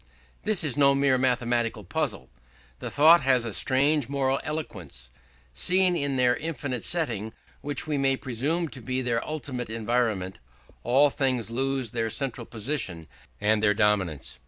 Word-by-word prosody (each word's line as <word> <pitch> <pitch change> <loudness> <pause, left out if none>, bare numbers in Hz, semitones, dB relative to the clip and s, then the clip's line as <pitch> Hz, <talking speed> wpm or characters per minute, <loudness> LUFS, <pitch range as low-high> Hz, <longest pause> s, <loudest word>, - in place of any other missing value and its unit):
This 215 -6 +1
is 145 -6 0
no 140 -1 +5
mere 135 -2 +3
mathematical 120 -3 0
puzzle; 100 - -3 0.5
the - - -5
thought 160 +3 +6
has 130 -3 +2
a 115 - -4
strange 140 +3 +2
moral 135 -1 0
eloquence. 90 - -7 0.4
Seen 180 - +2
in 140 -4 -1
their 125 -1 +3
infinite 145 -6 -4
setting, 115 - -1 0.3
which 145 -1 -2
we 150 -2 -1
may 135 -1 +2
presume 140 +8 -1
to 130 - -10
be 130 +2 -2
their 120 -1 -1
ultimate 135 -6 -5
environment, 110 -5 -1 0.4
all 135 +4 +4
things 130 -5 -1
lose 135 -1 -1
their 115 -1 -1
central 125 -1 -3
position 110 - -4 0.3
and 105 +1 +2
their 105 -2 +3
dominant 100 - +1
emphasis. 65 -2 -9
130 Hz, 155 wpm, -26 LUFS, 110-140 Hz, 0.5 s, thought